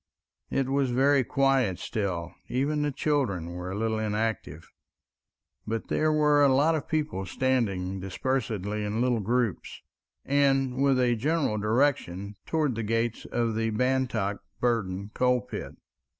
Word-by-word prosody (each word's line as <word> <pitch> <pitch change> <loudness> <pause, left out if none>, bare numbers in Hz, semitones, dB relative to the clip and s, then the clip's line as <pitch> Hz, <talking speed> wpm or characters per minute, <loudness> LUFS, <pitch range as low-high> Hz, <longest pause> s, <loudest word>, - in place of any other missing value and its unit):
It 135 -1 0
was 135 -1 +1
very 135 +2 +3
quiet 135 -7 +2
still, 90 -5 -3 0.2
even 145 +4 0
the 150 0 0
children 125 - -1
were 90 +1 -6
a 95 - -4
little 110 0 0
inactive, 105 -7 -2 1.0
but 115 0 -3
there 155 0 +2
were 150 -1 +4
a 140 - +5
lot 145 +5 +4
of 155 -3 -2
people 150 -11 -1
standing 100 -6 0
dispersedly 105 0 -2
in 105 +2 -2
little 125 -1 +2
groups, 115 -1 -1 0.4
and 135 -2 +2
with 135 -2 +3
a 120 -1 +3
general 140 -3 0
direction 105 -4 0
towards 155 -5 +1
the 115 - -3
gates 115 +1 -1
of 115 -2 -1
the 115 +1 0
Bantock 120 -4 0 0.2
Burden 100 -4 -1
coalpit. 125 -1 -1
120 Hz, 135 wpm, -27 LUFS, 105-135 Hz, 1.0 s, a